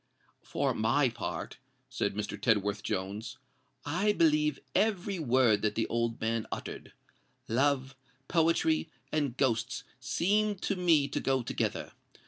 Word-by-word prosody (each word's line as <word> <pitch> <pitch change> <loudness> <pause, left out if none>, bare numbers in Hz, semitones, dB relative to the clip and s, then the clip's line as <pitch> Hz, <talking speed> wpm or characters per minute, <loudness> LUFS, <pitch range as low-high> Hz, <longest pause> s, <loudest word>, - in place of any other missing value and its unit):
"For - - -1
my 125 +5 +2
part," 120 -2 -5 0.3
said 100 - -2
Mr. 105 -1 -3
Tedworth 105 -2 +2
Jones, 105 +6 -4 0.5
"I 185 +8 +1
believe 150 -4 +3 0.2
every 195 -2 +1
word 125 -7 +3
that 105 -1 0
the 115 - +1
old 115 0 -1
man 115 0 -1
uttered. - - -6 0.5
Love, 135 +2 +1 0.3
poetry, 165 -1 +2 0.2
and 145 -5 -1
ghosts 125 +1 0 0.2
seem 205 +10 +1
to 200 +1 -2
me 165 -6 +3
to 140 - -2
go 135 -2 +1
together. - - -2
135 Hz, 125 wpm, -30 LUFS, 115-160 Hz, 0.5 s, believe